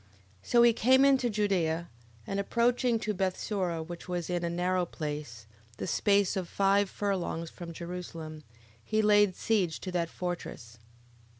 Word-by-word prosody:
11:5. - - -16
So 235 -1 +6
he 235 -1 +6
came 260 +4 +5
into 265 -3 +4
Judea, 180 -6 0 0.4
and 195 - -2
approaching 235 +3 +2
to 215 - -1
Bethsura, 185 -2 -1
which 175 +1 -8
was 175 -1 -3
in 175 -1 -1
a 170 - 0
narrow 180 +1 0
place, 150 -9 -6 0.3
the - - -4
space 200 +1 +2
of 185 -3 -3
five 200 0 +2
furlongs 180 -5 -2
from 170 -1 -8
Jerusalem, 165 -2 -7 0.4
he 215 - +1
laid 205 -3 +4
siege 195 -8 0
to 185 - -5
that 170 -2 -1
fortress. 150 -11 -6
185 Hz, 155 wpm, -30 LUFS, 170-205 Hz, 0.4 s, So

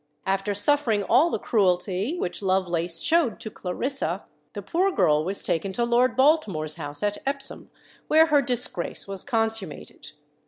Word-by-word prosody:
After 195 +1 -1
suffering 225 -2 +2
all 250 - +4
the - - -1
cruelty 195 - 0
which 180 - -4
Lovelace 175 -3 0
showed 320 -9 +2
to 220 - -7
Clarissa, 260 +10 -3 0.3
the - - -6
poor 370 +3 +1
girl 150 - +2
was 195 +4 -2
taken 170 +4 -1
to 240 - 0
Lord 240 0 +2
Baltimore's 230 - +2
house 145 +1 -5
at 205 0 -1
Epsom, 275 0 -3 0.4
where 315 +1 +6
her 295 -3 +3
disgrace 245 -10 -2
was 195 -1 -2
consummated. 225 - -3
210 Hz, 150 wpm, -25 LUFS, 180-275 Hz, 0.4 s, where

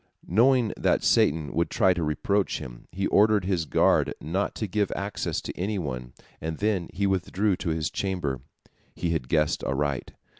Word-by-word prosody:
Knowing 120 +4 +3
that - - +1
Satan 75 -2 +2
would 85 +1 +1
try 95 -5 +3
to 85 -4 -1
approach 100 +6 0
him, - - -9
he 95 +3 -2
ordered 105 -2 +4
his 90 -4 0
guard - - +3
not 95 +7 -2
to 110 - -2
give 105 +1 0
access 100 0 -2
to - - -6
any 100 +4 -2
one, 65 -7 -5 0.3
and 80 0 -3
then 100 -5 0
he 100 +2 -1
withdrew 95 +1 +1
to - - -3
his 80 -1 -1
chamber. 85 -10 -2 0.5
He 85 - -1
had 75 -6 -2
guessed 75 -2 +1
aright. 70 -1 -1
90 Hz, 175 wpm, -26 LUFS, 75-100 Hz, 0.5 s, ordered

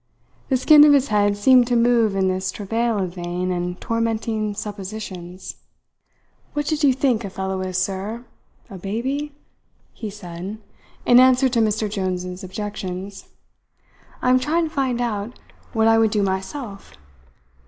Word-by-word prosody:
The 265 - +3
skin 295 +3 +7
of 295 -1 +7
his 280 -1 +3
head 205 -1 +2
seemed 250 +3 +5
to 245 - +1
move 230 -3 +3
in 190 -1 +2
this 185 0 -1
travail 225 +3 -1
of 185 -3 -2
vain 180 0 -3
and 180 0 -3
tormenting 225 -2 -1
suppositions. 195 -3 -7 1.0
"What 295 0 -1
did 310 0 -1
you 280 - +6
think 255 -3 +1
a 200 - -4
fellow 190 0 -3
is, 185 -1 -3
sir 195 +5 -3 0.4
a 195 -4 -10
baby?" 260 +10 -3 0.6
he 220 - -6
said, 190 0 -7 0.5
in 245 0 +7
answer 260 +1 +5
to 240 -1 0
Mr. 215 -1 +1
Jones's 185 -2 -3
objections. 195 0 -6 1.0
"I 250 - +3
am 255 - +5
trying 320 +5 0
to - - -20
find 260 -4 0
out 225 -1 -3 0.3
what 225 -1 +2
I 225 0 +5
would 225 -1 +4
do 210 -1 0
myself. 195 +3 -4
215 Hz, 155 wpm, -22 LUFS, 190-245 Hz, 1.0 s, skin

